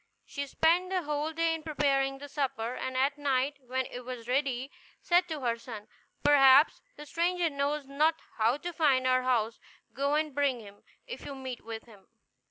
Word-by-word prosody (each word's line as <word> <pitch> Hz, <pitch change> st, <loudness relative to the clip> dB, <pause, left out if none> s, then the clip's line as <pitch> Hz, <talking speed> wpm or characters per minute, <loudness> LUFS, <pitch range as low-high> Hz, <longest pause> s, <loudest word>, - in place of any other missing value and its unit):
She 280 Hz, 0 st, -5 dB
spent 335 Hz, +6 st, +2 dB
the 370 Hz, -2 st, -1 dB
whole 300 Hz, +1 st, -2 dB
day 330 Hz, +1 st, +1 dB
in 325 Hz, -, -4 dB
preparing 275 Hz, -3 st, 0 dB
the 285 Hz, +1 st, -9 dB
supper; 270 Hz, -5 st, -2 dB
and 260 Hz, 0 st, -4 dB
at 280 Hz, +2 st, +1 dB
night, 280 Hz, 0 st, 0 dB
when 260 Hz, +1 st, -2 dB
it 250 Hz, -, -7 dB
was 245 Hz, -2 st, -7 dB
ready, 265 Hz, 0 st, -1 dB, 0.3 s
said 355 Hz, +1 st, +3 dB
to 310 Hz, -3 st, -5 dB
her 235 Hz, -2 st, -1 dB
son, 220 Hz, -3 st, -9 dB, 0.4 s
"Perhaps 280 Hz, 0 st, +6 dB
the 295 Hz, -, -10 dB
stranger 340 Hz, +2 st, 0 dB
knows 280 Hz, +1 st, -1 dB
not 300 Hz, +4 st, +2 dB, 0.2 s
how 230 Hz, +5 st, +3 dB
to 350 Hz, +3 st, -6 dB
find 280 Hz, -5 st, +3 dB
our 255 Hz, 0 st, +3 dB
house; 235 Hz, -3 st, 0 dB, 0.3 s
go 280 Hz, +3 st, 0 dB
and 305 Hz, -1 st, 0 dB
bring 280 Hz, -3 st, +1 dB
him, 205 Hz, -2 st, -13 dB, 0.2 s
if -, -, -8 dB
you 280 Hz, -, -7 dB
meet 260 Hz, -2 st, -7 dB
with 225 Hz, 0 st, -7 dB
him." 210 Hz, -5 st, -18 dB
275 Hz, 185 wpm, -30 LUFS, 255-300 Hz, 0.4 s, Perhaps